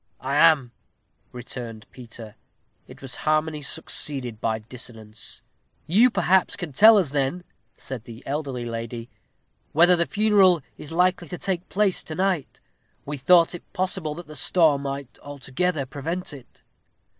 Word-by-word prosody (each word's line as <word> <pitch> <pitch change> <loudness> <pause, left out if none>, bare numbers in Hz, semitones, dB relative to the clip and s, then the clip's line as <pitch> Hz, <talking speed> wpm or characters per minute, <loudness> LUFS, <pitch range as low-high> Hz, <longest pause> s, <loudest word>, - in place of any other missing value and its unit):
"I 135 +2 -3
am," 150 -5 +4 0.6
returned 120 -2 -8
Peter. 115 -3 -11 0.5
It - - -14
was 130 -2 -4
harmony 155 0 0
succeeded 130 -4 -1
by 110 -1 0
dissonance. 110 -3 -10 0.4
"You, 220 +10 +5
perhaps, 190 -5 +2
can 175 -7 -7
tell 220 +9 +8
us, 175 -9 +1
then," 145 +5 -1 0.3
said 130 -4 -7
the 115 +2 -12
elderly 135 -4 -3
lady, 115 0 -6 0.6
"whether 175 +3 +6
the 170 -1 +1
funeral 200 -6 +4
is 150 - -9
likely 180 +1 +1
to 180 - -6
take 180 -1 -3
place 200 -2 +1
to 155 - -6
night? 185 -5 -1 0.5
We 145 +1 -4
thought 170 +5 +4
it 175 - -11
possible 185 -5 -2
that 175 +1 -9
the 155 - -12
storm 155 -4 +3
might 140 -4 -6
altogether 145 +2 -3
prevent 160 +6 -5
it." 135 -4 -15
150 Hz, 145 wpm, -24 LUFS, 125-180 Hz, 0.6 s, tell